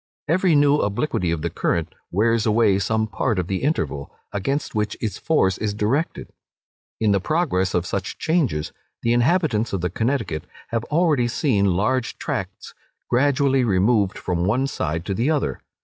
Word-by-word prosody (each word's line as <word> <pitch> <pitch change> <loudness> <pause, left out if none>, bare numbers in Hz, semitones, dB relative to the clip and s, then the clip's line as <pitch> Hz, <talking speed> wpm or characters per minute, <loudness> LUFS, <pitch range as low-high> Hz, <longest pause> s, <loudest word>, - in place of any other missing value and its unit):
Every 170 +1 +3
new 145 0 +5
obliquity 105 - -1
of 80 -2 -2
the 85 - -1
current 85 -2 -1 0.2
wears 110 +4 +2
away 105 -3 +3
some 110 +2 0
part 110 +1 -1
of 90 - 0
the 95 +1 -2
Interval, 75 - -1 0.2
against 135 +9 -2
which 105 -1 -1
its 110 -3 -3
force 95 - +1
is 105 -2 -2
directed. 125 +10 -1 0.7
In 110 -2 +2
the 100 - +3
progress 95 - 0
of 90 0 +1
such 95 0 -3
changes, 145 - 0 0.3
the 115 - +2
inhabitants 120 - +2
of 95 - -1
the 90 -1 -1
Connecticut 110 - -1 0.2
have 115 -1 -1
already 150 -6 +2
seen 120 -5 +1
large 120 +6 0
tracts - - -5 0.4
gradually 135 +1 +3
removed 100 -1 +2
from 90 -2 -2
one 115 +8 +1
side 80 - -3
to 100 - -2
the 115 +9 0
other. 150 -3 -1
110 Hz, 165 wpm, -22 LUFS, 95-135 Hz, 0.7 s, new